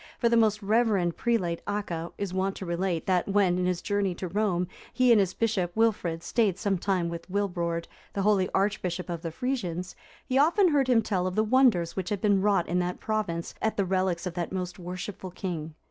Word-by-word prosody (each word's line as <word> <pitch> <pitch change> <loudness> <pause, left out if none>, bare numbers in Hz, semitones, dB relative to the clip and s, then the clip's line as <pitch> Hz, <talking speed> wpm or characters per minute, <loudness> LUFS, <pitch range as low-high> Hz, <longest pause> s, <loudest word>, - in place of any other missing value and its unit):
For 235 - +2
the 235 - +3
most 215 -2 +3
reverend 205 -5 +2
prelate, 185 -8 0
Acca,(352) 175 -5 -3
is 200 -3 -3
wont 190 +1 0
to 190 - -6
relate, 170 -1 -1
that 185 -2 +1
when, 195 -3 +2
in 180 - +1
his 180 -1 -1
journey 200 -3 0
to 185 - -4
Rome,(353) 180 -2 -1 0.2
he 255 -1 +4
and 225 - +7
his 190 -2 +1
bishop 205 -6 0
Wilfrid 200 -7 +1
stayed 210 -6 +1
some 195 -3 0
time 185 -2 0
with 170 +1 -6
Wilbrord,(354) 175 -4 -1 0.3
the 200 - -1
holy 200 -2 +3
archbishop 190 -3 -1
of 170 -1 -4
the 165 - -3
Frisians, 185 -4 -3 0.3
he 260 +1 +1
often 350 +6 +4
heard 280 -4 +2
him 235 -3 +4
tell 185 -4 0
of 185 - -3
the 215 - +3
wonders 215 -8 +3
which 185 -2 -3
had 205 - -1
been 200 -1 +3
wrought 200 -3 +2
in 180 +1 0
that 180 0 -2
province 205 -6 -2
at 220 - 0
the 200 - +2
relics 185 -2 0
of 180 - -3
that 175 -1 -3
most 180 -1 -4
worshipful 185 +2 -6
king. 165 -4 -5
190 Hz, 210 wpm, -27 LUFS, 175-210 Hz, 0.3 s, and